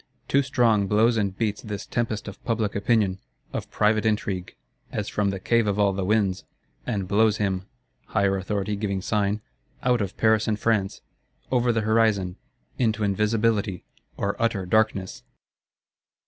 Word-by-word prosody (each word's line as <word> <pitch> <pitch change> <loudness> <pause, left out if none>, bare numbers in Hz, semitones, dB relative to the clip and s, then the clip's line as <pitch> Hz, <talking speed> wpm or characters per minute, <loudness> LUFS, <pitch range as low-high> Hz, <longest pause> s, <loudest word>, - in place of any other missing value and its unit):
Too 140 - +3
strong 120 -7 +2
blows 110 +4 +3
and 100 -3 -1
beats 105 -3 -1
this 105 -3 -6
tempest 110 -3 -2
of 100 0 -9
public 110 -3 -1
opinion, 100 -2 +1 0.3
of - - -4
private 105 0 +2
intrigue, 105 -4 -1 0.4
as - - -3
from 105 -1 0
the 95 -1 -3
Cave 115 +3 +2
of 100 -1 0
all 100 -1 +3
the 95 0 -2
Winds; 100 -2 +1 0.4
and 100 -6 -2
blows 105 +2 +3
him 95 -2 -1 0.4
(higher 100 -2 +1
Authority 100 +2 -2
giving 100 -2 -2
sign) 105 0 0 0.4
out 125 -2 +2
of 100 -1 -4
Paris 110 -1 +3
and 105 -1 0
France,—over 115 +3 -1
the 115 -1 0
horizon, 110 -4 +2 0.4
into 110 -3 +1
Invisibility, 105 -1 +1 0.3
or 100 0 -1
outer 110 -5 0
Darkness. 105 -1 +1
105 Hz, 145 wpm, -25 LUFS, 100-110 Hz, 0.4 s, Too